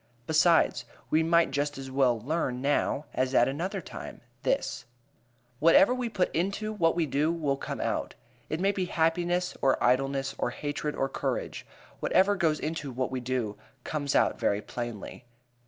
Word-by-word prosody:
Besides, 160 +3 +3 0.3
we 155 - +4
might 165 -1 +3
just 145 +1 -1
as 135 -1 -7
well 130 -3 +2
learn 130 0 -2
now 145 +1 0
as 130 +1 0
at 120 - +5
another 180 +8 -3
time, - - -9 0.2
this: - - -1 0.7
Whatever 165 +8 +6
we 250 -2 -2
put 185 -4 0
into 200 +5 -1
what 165 -6 +2
we 170 -2 +1
do 150 +3 +1
will 155 -5 0
come - - -5
out. - - -2 0.3
It 155 - -2
may 195 +2 +3
be 190 -2 -2
happiness 175 +1 0
or 135 - +3
idleness 135 +2 +1
or - - 0
hatred 145 +3 -3
or 135 - 0
courage; 135 - -3 0.3
whatever 200 +2 +3
goes 160 -5 +1
into 155 -2 -3
what 130 +1 -2
we 130 - -2
do 120 -4 -3 0.2
comes 145 -2 -2
out - - +3
very 100 - +1
plainly. 120 +1 -6
150 Hz, 165 wpm, -28 LUFS, 135-170 Hz, 0.7 s, Whatever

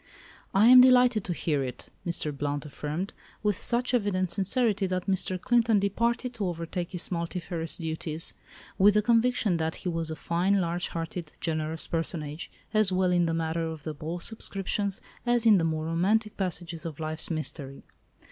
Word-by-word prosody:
"I 195 +3 +4
am 250 +1 +10
delighted 250 -4 +5
to 180 - -2
hear 150 -4 0
it," 125 -1 -6 0.2
Mr. 155 -3 -2
Blount 145 +1 -2
affirmed, 150 +6 -4 0.3
with 210 -2 +2
such 245 +6 0
evident 195 -6 +1
sincerity 205 0 +1
that 185 -1 -2
Mr. 190 -1 0
Clinton 235 +1 +3
departed 235 +5 0
to 215 -5 -2
overtake 170 +1 -4
his 180 +1 -3
multifarious 170 -1 -3
duties, 160 -1 -3 0.5
with 200 +2 +6
the 210 - +4
conviction 230 -5 +2
that 160 0 -1
he 180 - -4
was 165 -1 -2
a 160 - -3
fine, 180 +5 +1
large 175 0 -1
hearted, 165 -1 -5
generous 160 -1 -2
personage, 160 -2 -4 0.2
as 215 -3 +4
well 185 0 +2
in 175 -1 +3
the 165 - 0
matter 165 0 -1
of 160 -1 -7
ball 165 +3 -4
subscriptions 200 -1 -2 0.2
as 240 -1 +2
in 210 -4 +7
the - - 0
more 160 -1 -1
romantic 205 +7 +1
passages 175 -3 -3
of 165 -3 -6
life's 155 0 -2
mystery. 150 -4 -3
175 Hz, 165 wpm, -28 LUFS, 160-205 Hz, 0.5 s, am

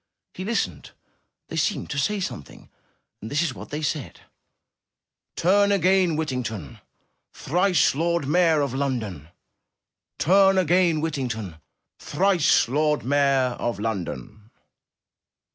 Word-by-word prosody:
He 185 - -6
listened. 195 - -3 0.6
They - - -5
seemed - - -1
to 140 - -2
say 210 +8 0
some 180 - -4
thing, 70 - -17 0.5
and 110 - -7
this 145 +2 0
was 165 -6 -1
what - - -10
they 150 +2 -5
said: 150 -2 -4 1.1
'Turn 200 +4 +3
again, 185 -3 +3
Whittington, 125 - -4 0.5
Thrice 180 -1 +2
Lord 170 0 -1
Mayor 165 -1 +3
of 140 -3 -2
London! 115 - -3 0.9
Turn 195 +2 +4
again, 175 -2 +2
Whittington, 120 - -4 0.4
Thrice 180 -10 +2
Lord 150 +3 0
Mayor 135 -2 +2
of 120 -4 -2
London!'' 105 - -5
145 Hz, 115 wpm, -24 LUFS, 120-180 Hz, 1.1 s, Turn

